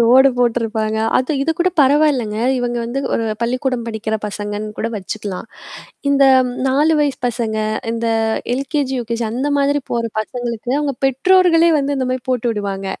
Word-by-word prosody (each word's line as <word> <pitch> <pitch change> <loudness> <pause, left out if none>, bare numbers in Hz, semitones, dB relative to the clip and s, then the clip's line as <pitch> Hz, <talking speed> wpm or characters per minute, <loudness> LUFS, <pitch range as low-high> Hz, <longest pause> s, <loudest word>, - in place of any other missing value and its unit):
Road 255 +4 +6
போட்டுருப்பாங்க. 225 -2 0 0.2
அது 255 +4 0
இது 310 - 0
கூட 355 +1 +3
பரவாயில்லங்க. 270 -6 +3 0.2
இவங்க 240 -1 -2
வந்து 240 +3 -3 0.2
ஒரு 230 - 0 0.2
பள்ளிக்கூடம் 255 0 -1
படிக்கிற 220 -1 -3
பசங்கன்னு 210 +1 -4
கூட 225 - -1
வச்சுக்கலாம். 205 +1 -5 0.6
இந்த 280 -1 +4 0.4
4 295 +5 +3
வயசு 290 -2 0
பசங்க, 230 -2 -2 0.4
இந்த 230 0 -2 0.5
எல்கேஜி 270 +1 -2
யுகேஜி 235 0 -3
அந்த 265 +5 -1
மாதிரி 285 +1 +2
போற 235 -1 0 0.2
பசங்களுக்கு 240 +1 -4
அவங்க 290 -2 -1
பெற்றோர்களே 340 +4 +4
வந்து 280 0 -1
இந்த 260 -1 -1
மாரி 255 -1 -2
போட்டு 245 -1 0
விடுவாங்க. 200 -2 -4
245 Hz, 150 wpm, -18 LUFS, 225-275 Hz, 0.6 s, Road